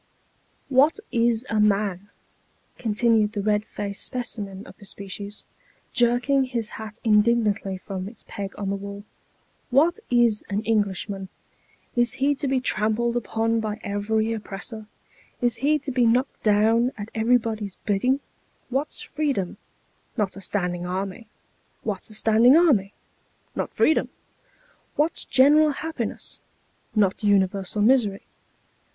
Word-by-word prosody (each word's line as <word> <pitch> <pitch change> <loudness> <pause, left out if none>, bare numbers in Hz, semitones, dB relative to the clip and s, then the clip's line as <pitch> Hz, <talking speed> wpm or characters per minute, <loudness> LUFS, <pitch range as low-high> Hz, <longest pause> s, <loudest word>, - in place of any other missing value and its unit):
" - - -40
What 310 +8 +3
is 235 0 +2
a 220 - 0
man? 200 -2 +1 0.4
" - - -40
continued 220 -1 +2
the 205 - -2
red 210 0 +2
faced 200 -2 -5
specimen 205 -5 -5
of - - -13
the 205 - -13
species, 200 +1 -8 0.5
jerking 250 +2 +3
his 235 -4 -3
hat 220 0 -8
indignantly 210 -3 +2
from 185 0 -6
its 225 - -15
peg 195 -1 -6
on 200 -1 -2
the - - 0
wall. 200 +1 -7 0.4
" - - -40
What 340 +6 +2
is 240 -3 +3
an 205 +1 -1
Englishman? 200 -3 -1 0.7
Is 240 -1 +2
he 280 +2 +2
to 285 0 -3
be 265 0 +2
trampled 235 0 +1
upon 225 -1 0
by 215 -1 -3
every 220 +2 0
oppressor? 215 +1 -7 0.5
Is 240 -1 0
lie 300 +2 +3
to 290 -1 -5
be 245 -2 +3
knocked 250 +4 +1
down 225 +4 +3
at 205 +1 -7
everybody's 220 -3 +1
bidding? 250 +7 +1 0.5
What's 275 +4 -1
freedom? 280 -12 -2 0.6
Not 205 -4 0
a 195 - -9
standing 180 -3 -1
army. 190 +4 -4 0.6
What's 205 -2 -3
a 215 - -6
standing 225 +6 +5
army? 240 - +3 0.6
Not - - -2
freedom. 315 - +2 0.9
What's 310 +3 0
general 295 +4 +5
happiness? 320 +3 -5 0.6
Not 200 -1 +2
universal 200 0 +2
misery. 215 -5 +3
220 Hz, 135 wpm, -24 LUFS, 200-245 Hz, 0.9 s, standing